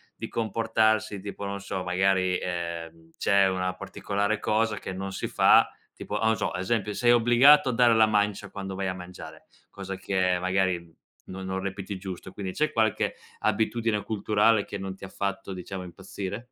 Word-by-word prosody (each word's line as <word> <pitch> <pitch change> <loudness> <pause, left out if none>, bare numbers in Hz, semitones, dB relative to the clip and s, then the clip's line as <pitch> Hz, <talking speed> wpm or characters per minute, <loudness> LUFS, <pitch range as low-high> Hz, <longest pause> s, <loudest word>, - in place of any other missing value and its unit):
di - - -6
comportarsi, 110 -2 +1
tipo, 100 +1 -7
non 100 0 -4
so, 95 -2 -4
magari, 95 0 +2
ehm, 85 -2 -5
c'è 100 -1 +4
una 90 0 -1
particolare 100 +2 -2
cosa 110 0 +1
che 95 - -6
non 95 +1 -5
si - - -3
fa, - - +5 0.2
tipo, - - -6
o 105 - -1
non 110 -2 +3
so, - - -1
ad 90 - -3
esempio, 105 0 -1
sei 120 +2 +3
obbligato 120 +4 +6
a - - 0
dare 120 -1 +5
la 110 0 +6
mancia 105 -1 0
quando 95 -1 -6
vai 95 0 -2
a 95 - -1
mangiare, 90 -3 -10 0.2
cosa 95 -1 -6
che, 95 -2 +1
magari, 90 -2 0 0.4
non 95 0 -7
non 95 0 -3
reputi 100 0 -5
giusto, 95 -1 -7
quindi, 95 -2 -5
c'è 155 0 0
qualche 110 -2 +1 0.2
abitudine 110 0 0
culturale 105 0 +2
che 100 - -6
non 95 -1 -5
ha - - -8
ti 95 - -9
fatto, 100 0 -3
diciamo, 95 +1 -6
impazzire? 95 +6 -7
100 Hz, 180 wpm, -27 LUFS, 95-110 Hz, 0.4 s, obbligato